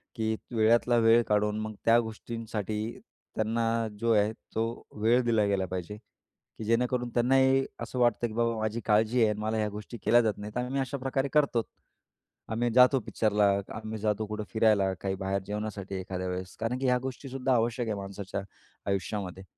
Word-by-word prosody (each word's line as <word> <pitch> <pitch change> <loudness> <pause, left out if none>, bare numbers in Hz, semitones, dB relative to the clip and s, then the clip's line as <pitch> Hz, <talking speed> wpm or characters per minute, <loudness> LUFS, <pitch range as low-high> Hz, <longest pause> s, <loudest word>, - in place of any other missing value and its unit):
की 110 0 0 0.2
वेळातला 115 +2 +4
वेळ 115 +1 +6
काढून 105 0 +1
मग 110 0 -4
त्या 115 +1 +6
गोष्टींसाठी 110 -2 -4 0.6
त्यांना 115 +1 0
जो 115 0 +1
आहे 105 0 +3 0.2
तो 110 - +2 0.4
वेळ 120 +3 +4
दिल्या 115 -3 +2
गेला 100 -2 +1
पाहिजे. 95 +3 -4 0.6
की - - -6
जेणेकरून 125 +2 +1
त्यांनाही 130 +2 +4 0.2
असं 125 - -4
वाटतं 120 -1 +2
की 110 - -9
बाबा 115 0 0
माझी 110 +1 -1
काळजी 110 +3 +3
आहे 110 - +5
आणि 105 0 -2
मला 110 +1 -1
ह्या 105 -1 0
गोष्टी 105 +3 -8
केल्या 120 +1 +6
जात 110 -3 0
नाहीत. 105 +2 -7
आम्ही 125 +3 -1
अशाप्रकारे 135 0 -2
करतोच. 140 -7 +2 0.8
आम्ही 115 +2 0
जातो 125 +1 +7
पिक्चरला. 105 -2 +2 0.3
आम्ही 110 0 -5
जातो 105 0 0
कुठं 105 0 -4
फिरायला. 105 -4 +3
काही 95 -1 -1
बाहेर 95 +1 -2
जेवणासाठी 105 -2 -4
एखाद्या 95 0 -4
वेळेस. 90 0 -5
कारण 115 +3 -1
की 135 - -2
ह्या 125 0 +4
गोष्टीसुद्धा 130 0 -2
आवश्यक 115 0 0
आहे 105 - -1
माणसाच्या 100 0 -5 0.5
आयुष्यामध्ये. 95 -1 -3
110 Hz, 170 wpm, -29 LUFS, 105-120 Hz, 0.8 s, जातो